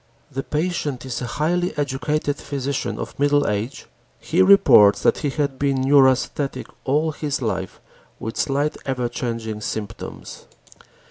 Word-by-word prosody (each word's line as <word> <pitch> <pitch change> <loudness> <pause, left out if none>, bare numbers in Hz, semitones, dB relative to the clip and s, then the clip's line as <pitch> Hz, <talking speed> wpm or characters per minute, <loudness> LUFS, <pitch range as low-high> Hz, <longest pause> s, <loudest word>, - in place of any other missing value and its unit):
The 135 - -3
patient 150 -5 -2
is 130 -2 -4
a 125 - -3
highly 175 +3 0
educated 145 +1 -1
physician 140 0 -3
of - - -7
middle 145 0 +3
age. 105 +6 -3 0.3
He 175 +4 +1
reports 135 - +6
that - - +3
he 145 - -1
had 140 -2 -2
been 140 -2 +1
neurasthenic 135 0 +2 0.2
all 150 +4 +1
his 145 -1 -3
life 95 -6 -3 0.4
with 110 +1 -5
slight 145 +1 0
ever 125 -2 -1
changing 115 -3 -4
symptoms. 105 0 -6
135 Hz, 135 wpm, -22 LUFS, 125-150 Hz, 0.4 s, reports